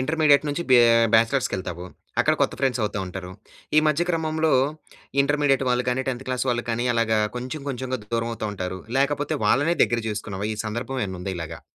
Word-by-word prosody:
Intermediate 150 Hz, +1 st, +3 dB
నుంచి 145 Hz, +4 st, -2 dB
బ్యా 125 Hz, -, +8 dB, 0.3 s
బ్యాచిలర్స్‌కెళ్తావు. 95 Hz, -7 st, +1 dB, 0.4 s
అక్కడ -, -, +3 dB
కొత్త -, -, +1 dB
ఫ్రెండ్స్ 130 Hz, -2 st, +1 dB
అవుతా 105 Hz, -1 st, -2 dB
ఉంటారు. 90 Hz, 0 st, -7 dB, 0.5 s
ఈ -, -, +8 dB
మధ్య 155 Hz, +3 st, +1 dB
క్రమంలో 160 Hz, -1 st, 0 dB, 0.7 s
ఇంటర్మీడియేట్ 140 Hz, -1 st, +2 dB
వాళ్ళు 125 Hz, 0 st, +1 dB
గానీ, 130 Hz, +2 st, -1 dB
10థ్ 130 Hz, 0 st, -3 dB
క్లాస్ 130 Hz, +1 st, -1 dB
వాళ్ళు 120 Hz, -1 st, 0 dB
కానీ 120 Hz, +2 st, -1 dB
అలాగా 110 Hz, -1 st, +2 dB, 0.2 s
కొంచెం, 130 Hz, +4 st, -5 dB
కొంచెంగా 130 Hz, -1 st, -3 dB, 0.2 s
దూరం 115 Hz, 0 st, -1 dB
అవుతా 110 Hz, -1 st, -4 dB
ఉంటారు. 95 Hz, 0 st, -5 dB, 0.2 s
లేకపోతే 145 Hz, +2 st, 0 dB
వాళ్ళనే 160 Hz, +5 st, +3 dB
దగ్గర 120 Hz, -1 st, -1 dB
చేసుకున్నావా? 105 Hz, -1 st, -4 dB
ఈ -, -, -10 dB
సందర్భం 120 Hz, +4 st, -4 dB
ఏమన్నా 95 Hz, -2 st, -6 dB
ఉందా 95 Hz, +1 st, -3 dB
ఇలాగా? 80 Hz, -2 st, -6 dB
125 Hz, 175 wpm, -24 LUFS, 110-145 Hz, 0.7 s, బ్యా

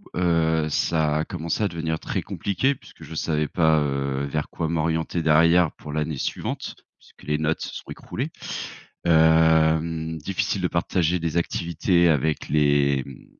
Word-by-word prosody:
heu, 80 Hz, -3 st, +2 dB
ça 75 Hz, 0 st, +1 dB
a 80 Hz, -, -1 dB
commencé 85 Hz, +4 st, -3 dB
à 105 Hz, -, +3 dB
devenir 80 Hz, -2 st, -3 dB
très -, -, -3 dB
compliqué 130 Hz, +8 st, -1 dB
puisque -, -, -16 dB
je 80 Hz, -, -9 dB
savais 75 Hz, -1 st, 0 dB
pas, 80 Hz, -2 st, +3 dB
heu, 70 Hz, -1 st, -1 dB
vers 75 Hz, +1 st, -3 dB
quoi 80 Hz, -, -3 dB
m'orienter 80 Hz, +1 st, -1 dB
derrière 85 Hz, +2 st, +4 dB
pour 75 Hz, -1 st, -9 dB
l'année 75 Hz, -1 st, -2 dB
suivante, -, -, -4 dB, 0.2 s
puisque -, -, -21 dB
les 75 Hz, 0 st, 0 dB
notes 80 Hz, +1 st, 0 dB
se -, -, -5 dB
sont -, -, -9 dB
écroulées. -, -, -5 dB, 0.8 s
Hem, 80 Hz, 0 st, +3 dB
difficile 90 Hz, +5 st, -2 dB
de -, -, +1 dB
partager 90 Hz, 0 st, +1 dB
des 80 Hz, 0 st, -2 dB
activités 85 Hz, +1 st, +1 dB
avec 75 Hz, +1 st, 0 dB
les, 70 Hz, -2 st, +2 dB
mmh, 65 Hz, -2 st, -12 dB
80 Hz, 155 wpm, -24 LUFS, 75-85 Hz, 0.8 s, derrière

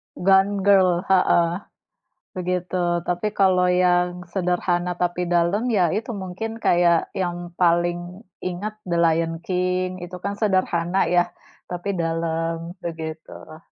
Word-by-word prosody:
Gone 195 Hz, +1 st, +3 dB
Girl, 185 Hz, -3 st, +4 dB
heeh, 175 Hz, -1 st, +3 dB, 0.8 s
begitu. 180 Hz, 0 st, -2 dB, 0.3 s
Tapi 175 Hz, +3 st, -1 dB
kalau 190 Hz, -3 st, +3 dB
yang 180 Hz, 0 st, +2 dB
sederhana 180 Hz, -1 st, 0 dB
tapi 180 Hz, 0 st, 0 dB
dalam 175 Hz, +5 st, +1 dB
ya, 185 Hz, -5 st, +3 dB
itu 230 Hz, +2 st, -3 dB
mungkin 190 Hz, +2 st, -5 dB
kayak 175 Hz, -3 st, +3 dB
yang 175 Hz, -2 st, -4 dB
paling 175 Hz, +1 st, +1 dB, 0.2 s
ingat 195 Hz, +4 st, -4 dB
The 170 Hz, -, 0 dB
Lion 165 Hz, 0 st, +2 dB
King, 180 Hz, 0 st, -1 dB
itu 180 Hz, +1 st, -8 dB
kan 200 Hz, 0 st, -2 dB
sederhana 185 Hz, -3 st, +1 dB
ya, 175 Hz, 0 st, +2 dB, 0.4 s
tapi 175 Hz, +2 st, -5 dB
dalam, 165 Hz, +1 st, -2 dB
begitulah. 160 Hz, -1 st, -7 dB
180 Hz, 120 wpm, -23 LUFS, 170-185 Hz, 0.8 s, Girl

